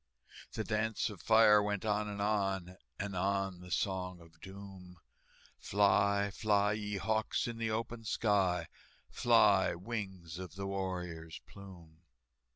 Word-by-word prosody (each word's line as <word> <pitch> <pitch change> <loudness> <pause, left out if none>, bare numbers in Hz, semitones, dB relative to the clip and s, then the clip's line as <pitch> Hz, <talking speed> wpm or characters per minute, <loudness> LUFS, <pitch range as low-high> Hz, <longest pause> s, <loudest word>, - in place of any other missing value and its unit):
The 110 - -2
dance 110 +1 -1
of 95 -6 -11
fire 110 0 +6
went 105 0 -2
on 105 0 0
and 100 -1 -3
on, 95 -3 -1 0.2
And 100 -1 -4
on 95 0 -1
the 90 0 -11
Song 90 0 -2
of 80 -1 -18
Doom, 95 -2 -11 0.6
"Fly, 100 0 +2
fly, 105 0 +2
ye 105 -1 -3
hawks, 110 +1 0
in 115 -1 -5
the 115 -1 -1
open 115 +1 -3
sky, 95 -6 +1 0.4
Fly, - - +4
wings 95 -4 -6
of 90 -2 -8
the 100 0 -5
warrior's 90 -4 -4
plume!" 85 -5 -14
100 Hz, 135 wpm, -33 LUFS, 90-105 Hz, 0.6 s, fire